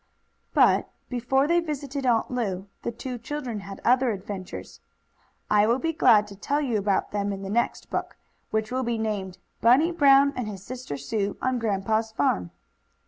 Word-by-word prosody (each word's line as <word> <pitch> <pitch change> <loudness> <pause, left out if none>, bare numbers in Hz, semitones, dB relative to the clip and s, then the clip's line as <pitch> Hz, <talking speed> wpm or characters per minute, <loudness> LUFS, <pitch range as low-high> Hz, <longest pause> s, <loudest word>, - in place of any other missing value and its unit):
But, - - +4 0.2
before 255 +2 +1
they 340 +3 +3
visited 280 -4 -3
Aunt 235 0 +2
Lu, 200 -7 -2 0.2
the - - -3
two 245 +1 -6
children 245 -2 -4
had 195 0 -9
other 250 +1 +4
adventures. 195 -2 -6 0.7
I 210 0 +4
will 235 +2 +3
be 325 +4 -1
glad 215 -8 +5
to 200 - -10
tell 285 +9 -1
you 245 -7 0
about 200 -1 0
them 205 0 -1
in 195 0 -5
the 195 - -5
next 235 +2 -1
book, - - -3 0.3
which 220 +1 -1
will 260 +1 0
be 235 -2 -1
named: 205 -4 -3 0.2
"Bunny 265 +9 +5
Brown 280 -3 +5
and 250 -3 -3
His 195 -3 -7
Sister 250 - -6
Sue 200 +8 -2
on 255 -1 0
Grandpa's 220 +1 0
Farm." 90 - 0
230 Hz, 175 wpm, -26 LUFS, 200-260 Hz, 0.7 s, glad